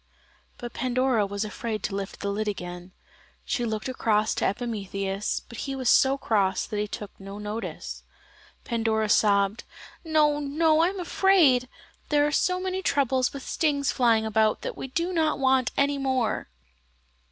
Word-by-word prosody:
But 240 Hz, -1 st, -7 dB
Pandora 255 Hz, -3 st, +1 dB
was 200 Hz, +1 st, -3 dB
afraid 215 Hz, +1 st, -4 dB
to 200 Hz, -, -2 dB
lift 200 Hz, 0 st, -5 dB
the 200 Hz, -, -1 dB
lid 215 Hz, +2 st, -2 dB
again. 180 Hz, -2 st, -5 dB, 0.5 s
She 240 Hz, -, -1 dB
looked 220 Hz, 0 st, -3 dB
across 220 Hz, -4 st, +1 dB
to -, -, -1 dB
Epimetheus, 200 Hz, -2 st, -3 dB
but 235 Hz, -, -9 dB
he 275 Hz, -1 st, -3 dB
was 260 Hz, -2 st, 0 dB
so 270 Hz, +1 st, +5 dB
cross 200 Hz, -7 st, +1 dB
that 210 Hz, -, -4 dB
he 210 Hz, -, -1 dB
took 205 Hz, 0 st, -7 dB
no 195 Hz, +1 st, -8 dB
notice. 210 Hz, +2 st, -6 dB, 0.6 s
Pandora 220 Hz, -2 st, 0 dB
sobbed: 200 Hz, 0 st, +3 dB, 0.4 s
"No, 305 Hz, -2 st, +3 dB
no, 310 Hz, +2 st, +2 dB
I 330 Hz, -, +5 dB
am 385 Hz, +1 st, -4 dB
afraid; 335 Hz, -9 st, +3 dB, 0.4 s
there 290 Hz, -1 st, +3 dB
are 295 Hz, -, 0 dB
so 365 Hz, +5 st, +1 dB
many 375 Hz, 0 st, -2 dB
troubles 265 Hz, -6 st, +1 dB
with 275 Hz, -2 st, -8 dB
stings 285 Hz, -3 st, 0 dB
flying 230 Hz, -3 st, +3 dB
about 220 Hz, 0 st, +2 dB
that -, -, -4 dB
we -, -, -6 dB
do 340 Hz, +7 st, -2 dB
not 315 Hz, -2 st, +1 dB
want 265 Hz, -2 st, +2 dB
any 280 Hz, 0 st, +2 dB
more?" 255 Hz, -, -1 dB
240 Hz, 165 wpm, -26 LUFS, 210-280 Hz, 0.6 s, so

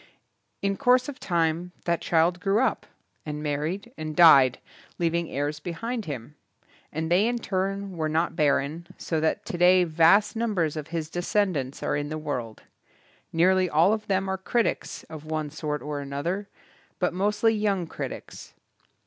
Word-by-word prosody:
In 195 Hz, 0 st, 0 dB
course 250 Hz, -1 st, +3 dB
of 290 Hz, -1 st, -7 dB
time 170 Hz, 0 st, 0 dB
that 170 Hz, -1 st, 0 dB
child 170 Hz, +2 st, +2 dB
grew 195 Hz, +3 st, +1 dB
up, 260 Hz, -, 0 dB, 0.4 s
and 150 Hz, -1 st, -5 dB
married, 160 Hz, -, -3 dB
and 155 Hz, -1 st, -4 dB
died 140 Hz, -7 st, +7 dB, 0.4 s
leaving 170 Hz, 0 st, 0 dB
heirs 145 Hz, +2 st, -2 dB
behind 215 Hz, +8 st, -4 dB
him. 140 Hz, -2 st, -6 dB, 0.6 s
And 160 Hz, +2 st, -3 dB
they 190 Hz, +5 st, +4 dB
in 240 Hz, 0 st, 0 dB
turn 195 Hz, -2 st, -2 dB
were 155 Hz, -2 st, -1 dB
not 165 Hz, +2 st, 0 dB
barren, 150 Hz, +3 st, 0 dB
so 160 Hz, -, -2 dB
that 160 Hz, 0 st, 0 dB
today 180 Hz, +1 st, +4 dB
vast 170 Hz, +7 st, +4 dB
numbers 205 Hz, -10 st, 0 dB
of 155 Hz, -1 st, -5 dB
his 165 Hz, -1 st, -4 dB
descendants 175 Hz, -7 st, -1 dB
are -, -, 0 dB
in 145 Hz, 0 st, -2 dB
the 155 Hz, -, -3 dB
world. 125 Hz, -8 st, -5 dB, 0.7 s
Nearly 185 Hz, +2 st, +3 dB
all 165 Hz, +7 st, +4 dB
of 215 Hz, -1 st, -4 dB
them 195 Hz, -1 st, 0 dB
are 190 Hz, 0 st, -2 dB
critics 235 Hz, +5 st, -1 dB
of 155 Hz, -2 st, -10 dB
one 155 Hz, -1 st, -3 dB
sort 150 Hz, -1 st, -4 dB
or 150 Hz, -1 st, -4 dB
another, 155 Hz, +9 st, -3 dB, 0.5 s
but 180 Hz, -, 0 dB
mostly 210 Hz, +4 st, +2 dB
young 205 Hz, -4 st, 0 dB
critics. -, -, -8 dB
170 Hz, 155 wpm, -26 LUFS, 155-195 Hz, 0.7 s, died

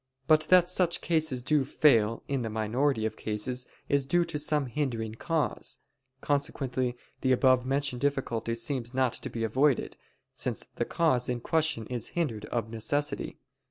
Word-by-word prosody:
But 155 Hz, 0 st, +4 dB
that 180 Hz, -1 st, +6 dB
such 180 Hz, -1 st, +1 dB
causes 155 Hz, -7 st, 0 dB
do 145 Hz, +1 st, +3 dB
fail 115 Hz, -6 st, +3 dB
in 140 Hz, -2 st, -1 dB
the 115 Hz, -, -3 dB
minority 110 Hz, +3 st, 0 dB
of 110 Hz, 0 st, -2 dB
cases 110 Hz, +4 st, -3 dB, 0.2 s
is 140 Hz, -1 st, +1 dB
due 175 Hz, +4 st, +3 dB
to 165 Hz, -3 st, -3 dB
some 150 Hz, -1 st, +1 dB
hindering 120 Hz, -4 st, -2 dB
cause; 160 Hz, +6 st, -1 dB, 0.4 s
consequently 130 Hz, -3 st, -1 dB, 0.2 s
the 130 Hz, -, +2 dB
above 130 Hz, -1 st, +4 dB
mentioned 135 Hz, -2 st, 0 dB
difficulty 130 Hz, -5 st, -1 dB
seems 120 Hz, +1 st, -3 dB
not 130 Hz, -2 st, +2 dB
to -, -, -4 dB
be 115 Hz, -, -4 dB
avoided, 130 Hz, +5 st, +1 dB, 0.4 s
since -, -, -3 dB
the -, -, 0 dB
cause 140 Hz, -8 st, +1 dB
in 125 Hz, -1 st, -1 dB
question 155 Hz, -3 st, 0 dB
is 120 Hz, -1 st, -4 dB
hindered 115 Hz, -11 st, -1 dB
of 110 Hz, 0 st, -3 dB
necessity. 145 Hz, +6 st, -2 dB
130 Hz, 160 wpm, -29 LUFS, 115-150 Hz, 0.4 s, that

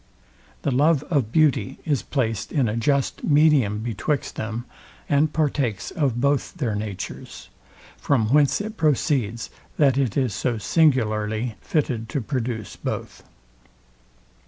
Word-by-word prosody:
The -, -, +1 dB
love 145 Hz, +3 st, +3 dB
of 135 Hz, -9 st, +1 dB
beauty 145 Hz, -10 st, +2 dB
is 145 Hz, -5 st, +1 dB
placed 115 Hz, -7 st, -2 dB
in 135 Hz, -6 st, +2 dB
a 105 Hz, -, -1 dB
just 135 Hz, +4 st, 0 dB
medium 145 Hz, -9 st, +3 dB
betwixt 120 Hz, +5 st, -2 dB
them, 115 Hz, +2 st, -4 dB, 0.4 s
and 150 Hz, +1 st, +2 dB
partakes 140 Hz, -10 st, -1 dB
of 140 Hz, -9 st, 0 dB
both 140 Hz, +4 st, 0 dB
their 125 Hz, -11 st, -1 dB
natures: 105 Hz, -2 st, -6 dB, 0.5 s
From 115 Hz, -7 st, +1 dB
whence 145 Hz, +4 st, +4 dB
it 215 Hz, +1 st, -6 dB
proceeds, 130 Hz, -7 st, 0 dB, 0.3 s
that 140 Hz, -3 st, +4 dB
it 130 Hz, -5 st, 0 dB
is 130 Hz, -6 st, +1 dB
so 120 Hz, +2 st, -1 dB
singularly 110 Hz, -, +1 dB
fitted 125 Hz, -8 st, -1 dB
to 140 Hz, -, -1 dB
produce 120 Hz, -4 st, -3 dB
both. -, -, -5 dB
130 Hz, 130 wpm, -23 LUFS, 110-145 Hz, 0.5 s, whence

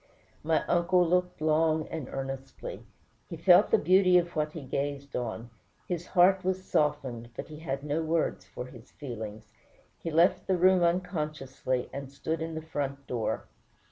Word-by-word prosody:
My 160 Hz, +1 st, +1 dB
uncle 175 Hz, 0 st, +3 dB
looked 180 Hz, -1 st, 0 dB
long 155 Hz, 0 st, +2 dB
and 155 Hz, -5 st, -5 dB
earnestly. 135 Hz, -, -6 dB, 0.4 s
He -, -, -6 dB
felt -, -, +6 dB
the 450 Hz, -, +5 dB
beauty 185 Hz, -, +5 dB
of 175 Hz, 0 st, 0 dB
what 150 Hz, 0 st, -1 dB
he 160 Hz, -, -7 dB
gazed 140 Hz, +1 st, -3 dB
on; 115 Hz, -1 st, -4 dB, 0.4 s
his 175 Hz, -1 st, -3 dB
heart 185 Hz, +1 st, +4 dB
was 185 Hz, 0 st, -1 dB
softened, 125 Hz, -6 st, 0 dB
but -, -, -6 dB
he 150 Hz, -1 st, -9 dB
had 135 Hz, -3 st, -4 dB
no 150 Hz, +2 st, -1 dB
words 160 Hz, -, 0 dB
for 105 Hz, +6 st, -7 dB
his 125 Hz, -2 st, -13 dB
feelings. 110 Hz, -5 st, -8 dB, 0.5 s
He 165 Hz, -, -4 dB
left 165 Hz, +3 st, +3 dB
the 190 Hz, -, +2 dB
room 185 Hz, +1 st, +5 dB
unconsciously, 155 Hz, -8 st, -1 dB
and 140 Hz, -1 st, -6 dB
stood 160 Hz, +4 st, -3 dB
in 160 Hz, 0 st, -4 dB
the 160 Hz, -, -5 dB
front 140 Hz, -3 st, -4 dB
door. 120 Hz, -4 st, -2 dB
155 Hz, 165 wpm, -29 LUFS, 135-175 Hz, 0.5 s, felt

